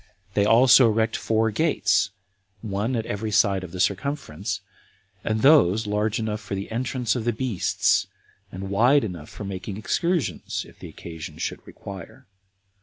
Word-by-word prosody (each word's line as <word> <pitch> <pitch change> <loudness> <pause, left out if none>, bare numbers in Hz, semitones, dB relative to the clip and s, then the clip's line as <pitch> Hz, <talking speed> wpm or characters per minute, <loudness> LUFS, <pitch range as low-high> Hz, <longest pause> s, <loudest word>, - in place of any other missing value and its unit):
They 100 - +2
also 125 +3 +7
erect 110 +1 +1
four 110 0 +1
gates, 105 - +2 0.5
one 105 +4 -2
at 115 -1 -2
every 110 +1 -3
side 100 -3 +2
of 90 - -8
the 90 - -7
circumference, 100 - -2 0.6
and 110 0 -1
those 115 - +5
large 105 +1 0
enough 110 -1 -3
for 100 - -5
the 100 +2 -5
entrance 125 0 -1
of 120 - -2
the 120 - +1
beasts, 115 -5 +1 0.4
and 95 +1 -6
wide 125 +8 +4
enough 85 -7 -6
for - - -9
making 95 0 -5
excursions, 170 - -1
if - - -19
occasion 80 -2 -9
should - - -3
require. 100 +6 -10
110 Hz, 150 wpm, -24 LUFS, 95-120 Hz, 0.6 s, also